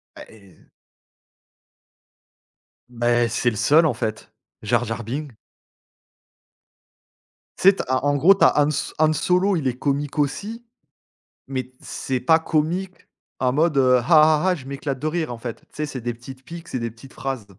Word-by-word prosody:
Bah -, -, -10 dB
et 100 Hz, -4 st, -18 dB, 2.4 s
Bah, 120 Hz, 0 st, +1 dB
c'est 120 Hz, +2 st, +1 dB
le 115 Hz, -, -6 dB
seul, 150 Hz, +10 st, +4 dB
en 155 Hz, -, +2 dB
fait. 110 Hz, -2 st, -5 dB, 0.3 s
Jar 120 Hz, +3 st, +1 dB
Jar 115 Hz, +1 st, -4 dB
Bing. 135 Hz, +4 st, -5 dB, 2.2 s
Tu 190 Hz, -, +6 dB
sais, 195 Hz, -, +3 dB
tu -, -, -3 dB
as, 130 Hz, +1 st, 0 dB
en 145 Hz, -, +2 dB
en -, -, +1 dB
gros 170 Hz, +8 st, +6 dB
tu -, -, 0 dB
as -, -, +3 dB
Han 145 Hz, +1 st, +3 dB
So -, -, -3 dB
Han 155 Hz, 0 st, +4 dB
Solo 180 Hz, +5 st, +2 dB
il 135 Hz, -4 st, -2 dB
est 125 Hz, -, -2 dB
comique 145 Hz, +2 st, -2 dB
aussi, 205 Hz, -, -2 dB, 0.8 s
mais 130 Hz, -2 st, -4 dB
c'est 130 Hz, -1 st, -4 dB
pas 160 Hz, +6 st, +4 dB
comique 170 Hz, +4 st, -2 dB, 0.3 s
en 125 Hz, -1 st, +1 dB
mode, 155 Hz, +1 st, +1 dB
heu: 130 Hz, -1 st, +5 dB
«Ah -, -, -5 dB
ah 155 Hz, 0 st, +6 dB
ah, 180 Hz, -, +2 dB
je 135 Hz, -6 st, -11 dB
m'éclate 140 Hz, -1 st, -4 dB
de 155 Hz, -, -2 dB
rire», 160 Hz, -4 st, -2 dB
en 120 Hz, -, -7 dB
fait. 115 Hz, 0 st, -6 dB
Tu -, -, -27 dB
sais 150 Hz, -, -2 dB
c'est 135 Hz, -4 st, -7 dB
des 120 Hz, +1 st, -3 dB
petites 130 Hz, +3 st, -12 dB
piques, 170 Hz, +2 st, -10 dB
c'est 130 Hz, -, -4 dB
des 115 Hz, -, -3 dB
petites 115 Hz, +4 st, -16 dB
phrases. 135 Hz, -6 st, -4 dB
135 Hz, 185 wpm, -22 LUFS, 120-155 Hz, 2.4 s, Tu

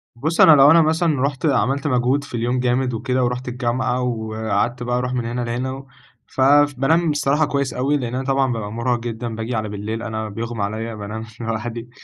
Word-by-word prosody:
بُص 155 Hz, +7 st, 0 dB
أنا -, -, +9 dB
لو 145 Hz, -1 st, +7 dB
أنا 165 Hz, 0 st, +7 dB
مثلًا 160 Hz, -3 st, +1 dB
رُحت 140 Hz, -2 st, -1 dB
عملت 135 Hz, +3 st, +1 dB
مجهود 130 Hz, +2 st, +1 dB
في 140 Hz, -, -13 dB
اليوم 120 Hz, +2 st, 0 dB
جامد 125 Hz, 0 st, 0 dB
وكده، 125 Hz, +3 st, -1 dB
ورُحت 125 Hz, +1 st, -2 dB
الجامعة 125 Hz, 0 st, -1 dB
وقعدت 110 Hz, 0 st, -2 dB
بقى 120 Hz, 0 st, -1 dB
أروح 125 Hz, 0 st, -2 dB
من 125 Hz, -2 st, -2 dB
هنا 120 Hz, +1 st, -3 dB
لهنا، 120 Hz, +2 st, -2 dB
و 135 Hz, 0 st, -8 dB, 0.4 s
ف -, -, -4 dB
فبانام 145 Hz, +3 st, +4 dB
بصراحة 145 Hz, +1 st, +1 dB
كويس 140 Hz, -2 st, -1 dB
أوي، 140 Hz, +4 st, +1 dB
لأن 125 Hz, -2 st, -4 dB
أنا 130 Hz, -, -2 dB
طبعًا 135 Hz, -2 st, +1 dB
بابقى 105 Hz, -2 st, -5 dB
مرهق 120 Hz, +1 st, -1 dB
جدًا، 115 Hz, 0 st, -5 dB
باجي 115 Hz, +2 st, -4 dB
على 110 Hz, -1 st, -2 dB
بالليل 105 Hz, +3 st, -5 dB
أنا 110 Hz, -1 st, -4 dB
بيُغمى 115 Hz, 0 st, -4 dB
عليَّ 110 Hz, +2 st, -4 dB
بانام 105 Hz, +2 st, -6 dB
لوحدي. 115 Hz, +1 st, -4 dB
125 Hz, 200 wpm, -21 LUFS, 115-135 Hz, 0.4 s, أنا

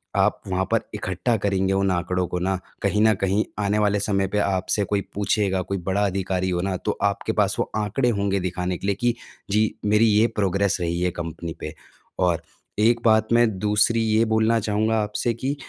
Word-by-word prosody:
आप -, -, +2 dB
वहाँ 95 Hz, 0 st, 0 dB
पर -, -, +3 dB
इकट्ठा 95 Hz, +6 st, -1 dB
करेंगे 95 Hz, -1 st, 0 dB
उन 95 Hz, 0 st, +1 dB
आंकड़ों 90 Hz, +1 st, -1 dB
को 90 Hz, -, -3 dB
ना, 95 Hz, +2 st, 0 dB, 0.3 s
कहीं 105 Hz, +1 st, +1 dB
न 110 Hz, 0 st, +5 dB
कहीं 100 Hz, +2 st, +2 dB, 0.2 s
आने 100 Hz, +1 st, +1 dB
वाले 105 Hz, -1 st, +2 dB
समय 100 Hz, -1 st, 0 dB
पे 105 Hz, +2 st, -2 dB
आपसे 100 Hz, +1 st, 0 dB
कोई 100 Hz, 0 st, 0 dB
पूछेगा 100 Hz, -2 st, 0 dB
कोई 100 Hz, +1 st, -3 dB
बड़ा 95 Hz, +3 st, 0 dB
अधिकारी 95 Hz, -1 st, -1 dB
हो 90 Hz, -1 st, -1 dB
ना 95 Hz, 0 st, -1 dB
तो -, -, -3 dB
आपके -, -, 0 dB
पास -, -, +1 dB
वो -, -, -1 dB
आंकड़े 110 Hz, +4 st, 0 dB
होंगे 100 Hz, -3 st, 0 dB
दिखाने 90 Hz, 0 st, -2 dB
के 100 Hz, -, -5 dB
लिए 100 Hz, -, +1 dB
कि 120 Hz, -1 st, +2 dB, 0.4 s
जी, 105 Hz, +1 st, +2 dB
मेरी 105 Hz, +2 st, +4 dB
ये 110 Hz, +1 st, +4 dB
प्रोग्रेस 100 Hz, -1 st, +1 dB
रही 85 Hz, 0 st, -1 dB
है 90 Hz, 0 st, +1 dB
कंपनी 85 Hz, -1 st, -6 dB
पे। 75 Hz, -, -6 dB, 0.5 s
और 90 Hz, -3 st, +2 dB, 0.4 s
एक 115 Hz, +2 st, +3 dB
बात 110 Hz, -1 st, +4 dB
मैं 120 Hz, 0 st, +5 dB
दूसरी 105 Hz, +3 st, +2 dB
ये 110 Hz, +1 st, +2 dB
बोलना 110 Hz, +1 st, +3 dB
चाहूँगा 110 Hz, +1 st, 0 dB
आपसे 105 Hz, +3 st, -1 dB
कि 130 Hz, +5 st, -3 dB
100 Hz, 200 wpm, -23 LUFS, 95-110 Hz, 0.5 s, न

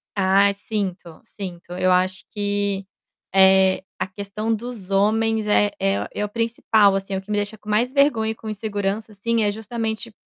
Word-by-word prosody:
Ah, 195 Hz, +1 st, +4 dB
sinto, 195 Hz, -5 st, -5 dB
sinto, 180 Hz, -3 st, -8 dB
eu 185 Hz, 0 st, +1 dB
acho 185 Hz, +1 st, +1 dB
que, 205 Hz, -1 st, -1 dB, 0.5 s
eh, 190 Hz, 0 st, +5 dB, 0.2 s
a -, -, -1 dB
questão 205 Hz, +3 st, -3 dB
dos 220 Hz, -4 st, -6 dB
homens 220 Hz, +2 st, +2 dB
é 205 Hz, 0 st, +3 dB
é 100 Hz, +1 st, 0 dB
é 210 Hz, -, -1 dB
o 205 Hz, -, -6 dB
principal, 220 Hz, -3 st, +2 dB
assim, 195 Hz, 0 st, -3 dB
o 190 Hz, -, -2 dB
que 195 Hz, -, -22 dB
me 205 Hz, -, +1 dB
deixa 205 Hz, +1 st, -2 dB
com 215 Hz, -, -12 dB
mais 235 Hz, +5 st, +2 dB
vergonha 265 Hz, -6 st, +3 dB
e -, -, -6 dB
com 220 Hz, -, -8 dB
insegurança, 210 Hz, 0 st, -3 dB
assim, 225 Hz, +2 st, 0 dB
é 205 Hz, -, +2 dB
justamente 220 Hz, +1 st, -4 dB
205 Hz, 175 wpm, -22 LUFS, 195-220 Hz, 0.5 s, eh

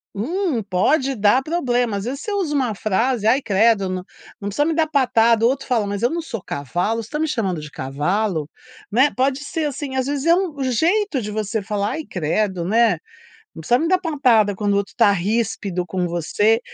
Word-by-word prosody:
um 305 Hz, -, -1 dB
pode 260 Hz, -, +1 dB
dar 210 Hz, +4 st, +3 dB
problema. 245 Hz, -9 st, 0 dB
Às 200 Hz, -, -5 dB
vezes 270 Hz, +4 st, -4 dB
você 425 Hz, -, -5 dB
usa 375 Hz, -7 st, -1 dB
uma 250 Hz, -6 st, 0 dB
frase, 215 Hz, +3 st, 0 dB
ai 255 Hz, +5 st, +4 dB
credo 210 Hz, -2 st, +2 dB
não 185 Hz, 0 st, -3 dB, 0.4 s
precisa 205 Hz, +8 st, 0 dB
me 325 Hz, -, +1 dB
dar 320 Hz, 0 st, +3 dB
patada, 235 Hz, -6 st, +3 dB
o -, -, +5 dB
outro 270 Hz, +1 st, -2 dB
fala 230 Hz, -4 st, +1 dB
mas 200 Hz, +2 st, -4 dB
eu 240 Hz, -, +4 dB
não 340 Hz, +1 st, -2 dB
sou 255 Hz, -8 st, -6 dB
cavalo, 175 Hz, -, -2 dB
você -, -, -11 dB
está 300 Hz, -, -4 dB
me 315 Hz, -, +1 dB
chamando 195 Hz, -, -1 dB
de 150 Hz, 0 st, -9 dB
cavalo? 155 Hz, +5 st, -1 dB, 0.4 s
Né, 260 Hz, +7 st, +4 dB
pode 265 Hz, +1 st, +1 dB
ser 305 Hz, +2 st, -3 dB
assim, 280 Hz, -1 st, -4 dB
às 260 Hz, -1 st, 0 dB
vezes 285 Hz, +1 st, -2 dB
é 335 Hz, -, +6 dB
um 340 Hz, -7 st, -2 dB
jeito 320 Hz, -, +1 dB
de 210 Hz, -1 st, -5 dB
você 215 Hz, +1 st, -2 dB
falar, 205 Hz, 0 st, -2 dB
ai 315 Hz, -1 st, -5 dB
credo, 180 Hz, +2 st, -1 dB
né. 220 Hz, -1 st, +3 dB, 0.6 s
Não -, -, -9 dB
precisa 240 Hz, +9 st, +3 dB
me 325 Hz, -, 0 dB
dar 370 Hz, +1 st, +3 dB
patada 250 Hz, -, +2 dB
quando 205 Hz, +1 st, 0 dB
o -, -, +2 dB
outro 200 Hz, 0 st, -2 dB
está 230 Hz, -4 st, +4 dB
ríspido 200 Hz, -2 st, -1 dB
com 180 Hz, +1 st, -2 dB
você. 190 Hz, +7 st, +1 dB
230 Hz, 210 wpm, -21 LUFS, 200-275 Hz, 0.6 s, é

